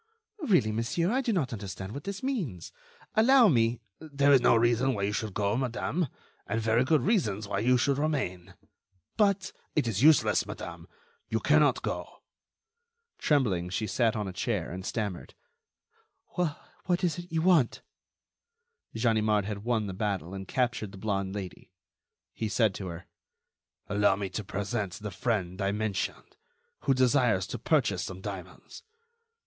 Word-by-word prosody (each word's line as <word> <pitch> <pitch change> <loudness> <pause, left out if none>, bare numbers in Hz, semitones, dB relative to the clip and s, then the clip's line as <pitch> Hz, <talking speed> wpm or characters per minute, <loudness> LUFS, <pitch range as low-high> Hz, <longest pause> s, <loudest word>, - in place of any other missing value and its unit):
"Really, 180 - +3
monsieur, 115 - 0
I 260 +3 +2
do 245 -3 0
not 155 - 0
understand 95 -2 -6
what 140 - -7
this 200 +2 -5
means. 185 - -3 0.4
Allow 240 +1 +6
me—" 115 -4 +2 0.2
"There 140 -2 +2
is 135 - +6
no 120 - +5
reason 120 +3 +2
why 100 - -2
you 100 +1 0
should 105 -2 -3
go, 100 +1 +1
madame, 130 +6 -1 0.4
and 115 - -1
very 115 +2 +2
good 145 -1 +2
reasons 110 - +1
why 100 -1 -1
you 125 +4 +3
should 140 +3 +1
remain." 95 - -2 0.6
"But—" 200 -3 +1 0.2
"It 150 -6 +2
is 110 -2 -1
useless, 155 +2 +5
madame. - - -8 0.4
You - - 0
cannot - - +3
go." - - -5 1.0
Trembling, 105 - +1
she 100 +4 -2
sat 115 +2 +1
on 105 -2 -2
a 95 - -5
chair, 100 -3 -2
and 95 +2 -6
stammered: 100 -3 -4 0.9
"What 175 +2 -3
is 175 -1 0
it 175 +1 -10
you 160 -1 0
want?" 170 -9 +3 1.1
Ganimard 110 -3 +2
had 105 -1 -5
won 115 -2 0
the 95 - -4
battle 95 -3 -2
and 95 -1 -6
captured 115 -5 -1
the - - -9
blonde 100 -1 -2
Lady. 95 -3 -7 0.6
He 110 - -3
said 110 -1 +2
to 95 -1 -6
her: 85 0 -7 0.8
"Allow 100 -1 +3
me 100 -1 -4
to 105 +3 -4
present 100 -1 -3
the 105 +1 -6
friend 95 -3 -2
I 100 0 +1
mentioned, 105 -2 -3 0.5
who 135 - +3
desires 125 -7 +3
to - - -6
purchase 120 - +1
some 95 -1 -6
diamonds. 95 -2 -8
110 Hz, 155 wpm, -29 LUFS, 100-140 Hz, 1.1 s, Allow